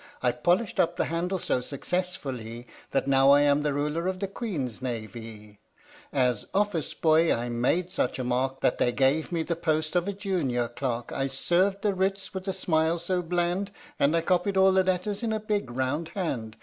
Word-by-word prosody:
I 125 - +4
polished 175 - 0
up 165 - +2
that - - 0
handle 175 +3 -1
so 150 - 0
successfullee 135 -5 -3 0.2
That - - 0
now 135 0 +5
I 140 +1 +7
am 145 0 +3
the 150 0 0
Ruler 150 +5 -1
of 185 0 -1
the 195 - -3
Queen's 165 - -4
Navee. 110 -3 -7 0.5
As 125 -5 +1
office 200 -6 0
boy 160 +1 +4
I 120 +1 0
made 130 +10 0
such 125 - -1
a 130 - -2
mark 130 +2 -1
That - - +1
they 120 - +3
gave 140 +7 +1
me 165 -2 0
the 170 - -2
post 155 -1 0
of 175 +1 +2
a 200 - -1
junior 170 - -1
clerk; 120 -1 -3
I 135 - -1
served 185 +8 +1
the 205 -2 +2
writs 190 +1 -1
with 190 0 -6
a - - +1
smile 165 -3 +1
so 180 +2 -1
bland, 175 +3 -1 0.3
And 150 +4 +3
I - - +2
copied 185 +3 +1
all 190 0 +6
the 190 0 +4
letters 185 +2 -1
in 230 -2 -1
a 220 - 0
big 210 - -2
round 130 +6 -2
hand. 120 - -3
160 Hz, 200 wpm, -27 LUFS, 130-185 Hz, 0.5 s, I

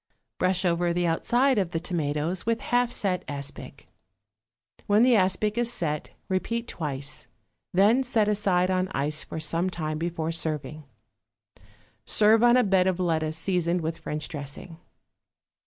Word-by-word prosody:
Brush 185 0 +1
over 175 0 +1
the 175 0 0
outside 240 +9 +2
of 185 -4 -1
the 165 - -2
tomatoes 165 0 -1
with 230 0 0
half 245 0 +1
set 185 -5 0
aspic; 140 0 -6 1.0
when 210 +3 +4
the 250 -1 +5
aspic 210 +3 +1
is 240 0 +3
set, 150 -8 -2 0.2
repeat 230 +5 -2
twice, 140 -4 -4 0.4
then 205 +8 +4
set 240 -5 +1
aside 190 -3 +1
on 185 0 +1
ice 150 +3 -1
for - - -6
some 165 +3 0
time 155 -3 -4
before 165 -1 -2
serving. 155 -2 -3 1.2
Serve 220 +1 +4
on 240 +1 +6
a 250 - +4
bed 190 -2 +3
of 185 -1 0
lettuce 160 -3 0
seasoned 175 0 0
with 165 +1 -4
French 150 -2 -4
dressing. 150 +3 -8
180 Hz, 145 wpm, -26 LUFS, 160-205 Hz, 1.2 s, on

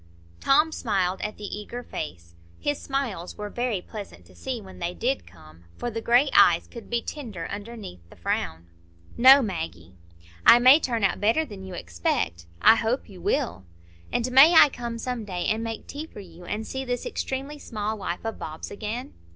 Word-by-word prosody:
Tom 305 +4 +4
smiled 190 -9 -1
at 210 - -4
the 210 - -11
eager 210 +4 -6
face; 85 - -7 0.3
his 290 -1 -2
smiles 250 -11 -3
were 210 0 -5
very 240 -7 -2
pleasant 200 - -9
to 90 - -19
see 250 - -4
when 190 -3 -12
they 175 +1 -3
did 265 +3 -1
come, 80 0 -17
for 240 - -3
the 225 0 -4
gray 245 +5 +4
eyes 170 -1 +6
could 235 -3 -11
be 235 0 -1
tender 215 - -6
underneath 205 - -7
the - - -15
frown. 85 -1 -3 0.5
"No, 265 +3 +8
Maggie." 160 - -5 0.5
"I - - +9
may 255 +5 +7
turn 235 -7 -1
out 195 - +1
better 230 +10 +3
than 205 -8 -10
you 190 -1 -7
expect." 85 - -2 0.2
"I 225 - +8
hope 230 +4 -1
you 185 -3 -12
will." 90 - -1 0.5
"And 245 +1 -1
may 285 +7 +8
I 300 - +9
come 235 -3 -5
some 245 0 -4
day 180 -4 -4
and 220 +1 0
make 225 -1 -5
tea 300 +3 -7
for 210 - -12
you, 175 -2 -12
and 215 +4 -3
see 265 +3 -4
this 245 -2 -3
extremely 275 +3 -4
small 215 -4 -3
wife 195 -1 -5
of 225 - -4
Bob's 155 0 -7
again?" 225 +6 -5
220 Hz, 190 wpm, -26 LUFS, 175-250 Hz, 0.5 s, I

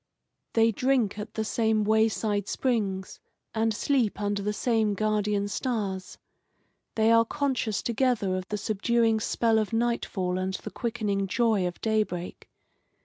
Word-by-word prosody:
They 225 0 +4
drink 235 -3 +1
at 210 +1 -7
the 220 - -1
same 220 -1 +1
way 220 +1 +4
side 205 -2 -2
springs, 200 -7 -1 0.3
and 225 0 +1
sleep 235 -1 0
under 205 -1 -1
the 210 +1 -1
same 220 -1 +1
guardian 210 -1 0
stars. 205 -5 -3 0.8
They 220 0 +3
are 230 0 +6
conscious 255 -4 -1
together 235 -5 +1
of 185 0 -4
the 210 - -3
subduing 225 +2 +1
spell 225 +1 +2
of 215 +1 -2
nightfall 225 -6 0
and 190 0 -2
the - - -7
quickening 205 -4 -2
joy 220 -3 +2
of 175 - -6
daybreak. 210 -5 -2
215 Hz, 145 wpm, -27 LUFS, 200-230 Hz, 0.8 s, are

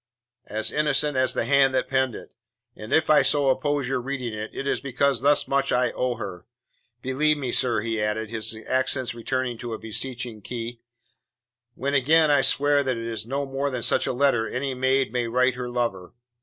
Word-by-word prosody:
"As 110 +1 -2
innocent 150 -1 +1
as 130 0 +1
the - - 0
hand 135 0 +4
that 130 - +1
penned 130 -3 0
it, - - -11 0.4
and 105 - -9
if 160 - +3
I 155 -1 +6
so 145 -2 +2
oppose 145 0 0
your 130 -1 -1
reading 125 -3 -4
it, 110 +1 -5
it 135 - -6
is 140 - -1
because 140 +1 0
thus 145 +1 +3
much 140 0 +1
I 125 -1 +2
owe 125 -1 -1
her. 95 -5 -7 0.6
Believe 150 +4 +2
me, 130 -4 -3
sir," 120 -5 +2
he 110 -1 -2
added, 105 +1 -2
his 110 -1 -2
accents 130 -1 0
returning 120 0 -3
to 120 -1 -5
a - - -4
beseeching 120 0 -5
key, 115 +1 -6 0.9
"when 140 +2 -2
again 150 +3 +4
I 145 -2 +4
swear 145 +1 +3
that 130 -3 -1
it 115 - -5
is 115 -1 -3
no 140 +3 -2
more 135 +1 -2
than 125 -3 -4
such 125 - +1
a - - +1
letter 125 -4 +2
any 135 +1 -3
maid 130 +1 +1
may 120 -1 0
write 125 +2 +2
her 125 0 -5
lover. 115 -7 -3
130 Hz, 200 wpm, -25 LUFS, 115-140 Hz, 0.9 s, I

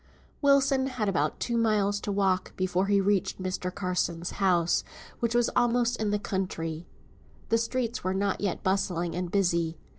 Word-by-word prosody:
Wilson 275 -2 +4
had 250 -5 -2
about 155 -6 0
two 240 - -1
miles 210 -3 +2
to 205 - -4
walk 190 -2 0
before 185 +1 0
he 200 0 +3
reached 195 -1 +1
Mr. 185 -1 -3
Carson's 180 -2 -2
house, 175 -3 +3 0.4
which 235 0 0
was 240 -1 +3
almost 240 0 +2
in 215 -1 -1
the 210 - +1
country. 175 -5 -3 0.6
The 230 - +3
streets 235 0 -2
were 185 +1 -1
not 200 +1 0
yet 200 -4 -2
bustling 180 -3 0
and 180 0 -3
busy. 170 -4 +1
195 Hz, 160 wpm, -28 LUFS, 180-230 Hz, 0.6 s, Wilson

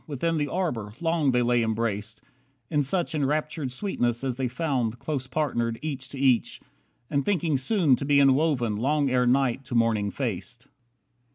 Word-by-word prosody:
Within 165 +3 -1
the 145 -1 0
arbour, 125 - -2
long 165 -3 +1
they 125 -1 +2
lay 120 0 +2
embraced, 110 -1 -2 0.5
In 150 - +2
such 170 +5 0
enraptured 150 -1 -1
sweetness 125 - -1
as 130 -2 -1
they 130 0 -1
found 125 -3 -1
Close 130 0 -4
partnered 120 -5 -1
each 135 -4 -4
to 140 - -9
each, 130 -3 +2 0.5
and 140 -2 +1
thinking 170 -5 0
soon 150 - +3
To - - -5
be 145 0 +3
enwoven, 135 -5 +3
long 140 +3 +1
ere 125 -1 +2
night 135 0 +2
to 125 -1 -5
morning 115 -3 +2
faced. - - -4
135 Hz, 165 wpm, -26 LUFS, 120-150 Hz, 0.5 s, soon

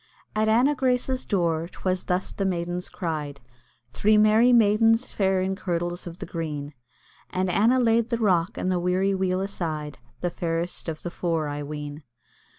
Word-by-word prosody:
At 215 0 +2
Anna 245 +6 +4
Grace's 255 -1 0
door 170 -4 0
'twas 185 0 -3
thus 180 +1 -1
the 200 - -3
maidens 175 -1 -2
cried, 150 -6 -4 0.5
Three 215 - +3
merry 215 +3 +5
maidens 225 +1 +4
fair 190 -2 +2
in 190 +1 -1
kirtles 175 -2 -3
of 170 0 -8
the - - -6
green; 150 -3 -5 0.6
And 185 0 -1
Anna 230 +8 +4
laid 230 -1 +2
the 235 - 0
rock 185 -6 +1
and 185 - -1
the 180 - +1
weary 185 +2 +1
wheel 190 -1 0
aside, 160 -7 -4 0.2
The 175 - -1
fairest 170 0 -3
of 155 -1 -6
the 175 - -4
four, 165 -3 -1
I 145 0 -4
ween. 145 0 -6
185 Hz, 165 wpm, -25 LUFS, 165-215 Hz, 0.6 s, merry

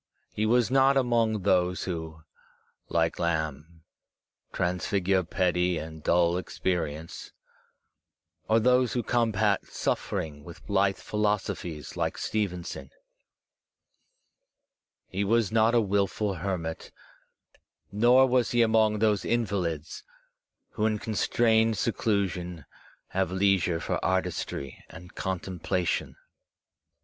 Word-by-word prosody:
He 110 +1 0
was 120 +1 +3
not 135 +1 +4
among 115 -5 +1
those 90 -2 +2
who, 80 -3 -5 0.7
like 80 -1 0
Lamb, 80 -1 -3 0.7
transfigure 95 +1 0
petty 90 0 0
and 80 0 -7
dull 85 +2 +2
experience, 85 -4 -4 1.2
or 110 +1 +5
those 125 +2 +3
who 120 - -1
combat 110 -4 +1
suffering 75 -2 -3
with 85 +2 -12
blithe 95 -1 +1
philos 105 -1 0
ophies 80 -4 -6
like - - -2
Stevenson; 90 -9 -3 2.2
he 95 +2 -2
was 110 0 +2
not 115 +1 +3
a - - +6
wilful 100 0 0
hermit; 85 -2 -4 1.0
nor 120 +5 +5
was 125 -2 +2
he 120 -1 +3
among 110 -1 +3
those 105 -2 +2
invalids 95 -9 -2 0.7
who, 110 0 0
in 110 -1 0
constrained 110 +1 +2
seclusion, 90 - -1 0.4
have 95 -2 -1
leisure 95 -3 +2
for - - -3
artistry 90 -7 -2
and 90 +1 -12
contemplation. 90 -1 -2
95 Hz, 100 wpm, -27 LUFS, 85-110 Hz, 2.2 s, a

